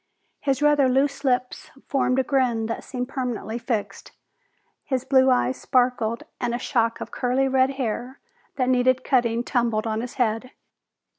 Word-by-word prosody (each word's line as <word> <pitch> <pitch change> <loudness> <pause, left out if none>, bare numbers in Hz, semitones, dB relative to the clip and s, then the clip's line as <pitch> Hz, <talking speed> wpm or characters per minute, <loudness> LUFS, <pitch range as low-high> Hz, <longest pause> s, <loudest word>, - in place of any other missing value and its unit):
His 275 0 0
rather 295 -3 +4
loose 275 +2 +1
lips 250 -2 -1 0.2
formed 265 -2 +1
a 265 - +3
grin 250 -4 +1
that 230 - -4
seemed 250 -2 -4
permanently 245 -4 -4
fixed. 230 -4 -4 0.7
His 260 -2 -2
blue 265 -1 +4
eyes 255 0 +1
sparked 245 -3 +1 0.2
and 240 -1 -1
a - - -1
shock 230 -2 0
of - - -6
curly 255 +2 0
red 265 0 +2
hair 250 +1 -3 0.4
that 255 -2 0
needed 255 0 +2
cutting 240 -3 +1
tumbled 235 -3 0
on 220 0 -1
his 245 0 -7
head. 235 +1 -1
250 Hz, 155 wpm, -24 LUFS, 235-265 Hz, 0.7 s, rather